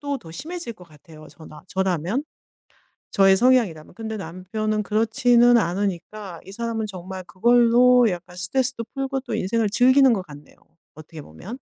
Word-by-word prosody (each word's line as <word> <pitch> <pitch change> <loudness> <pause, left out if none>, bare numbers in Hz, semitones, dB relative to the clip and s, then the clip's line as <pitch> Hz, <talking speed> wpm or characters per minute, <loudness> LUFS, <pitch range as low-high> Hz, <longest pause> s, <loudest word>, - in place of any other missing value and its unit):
또 285 -2 -3
더 165 - -14
심해질 315 - -7
것 180 - -15
같아요 155 0 -16
저라 155 -1 -14
저라면 190 - -1 0.9
저의 195 -1 +4
성향이라면. 230 -11 +1
근데 220 0 -5
남편은 210 +4 -3
그렇지는 235 +3 +3
않으니까 195 -1 -3
이 190 - -11
사람은 225 0 -3
정말 185 -1 -8
그걸로 240 +4 +4
약간 180 0 -7
스트레스도 240 +7 -2
풀고 270 -1 -3
또 240 -3 -7
인생을 220 +1 0
즐기는 260 +4 +5
것 190 -4 -3
같네요. 145 -3 -14 0.4
어떻게 155 0 -11
보면. 170 - -10
215 Hz, 350 characters per minute, -23 LUFS, 180-240 Hz, 0.9 s, 즐기는